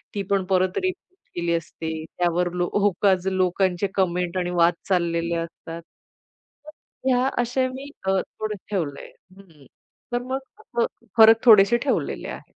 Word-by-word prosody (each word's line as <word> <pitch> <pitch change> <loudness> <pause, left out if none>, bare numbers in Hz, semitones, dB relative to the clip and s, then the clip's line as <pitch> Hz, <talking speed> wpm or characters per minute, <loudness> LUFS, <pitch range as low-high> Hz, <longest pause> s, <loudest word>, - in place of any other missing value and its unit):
ती 200 - -1
पण 195 -2 +2
परत 185 0 +1
रिपीट 370 0 -4 0.2
केली 170 -1 -1
असते. 160 0 -5
त्यावर 175 +1 -1
लो 175 0 -1
होकाज 195 -2 +2
लोकांचे 185 0 +1
कमेंट 180 -1 0
आणि 180 -1 -1
वाद 170 +1 +5 0.2
चाललेले 170 -2 0
असतात. 165 0 -6 0.8
तर - - -10 0.4
ह्या 255 +1 +3
असे 255 +2 0
मी 270 +2 -8
अ, 190 0 +2
थोडे 215 -1 -5 0.2
ठेवलय 155 -8 -3 0.3
हं, - - -12
हं. 155 -7 -20 0.5
तर 245 - +1
मग 260 +2 -3 0.4
अस - - +4 0.3
फरक 225 0 +7
थोडेसे 215 +1 +7
ठेवलेले 275 +2 -2
आहेत. - - -7
190 Hz, 150 wpm, -24 LUFS, 175-225 Hz, 0.8 s, फरक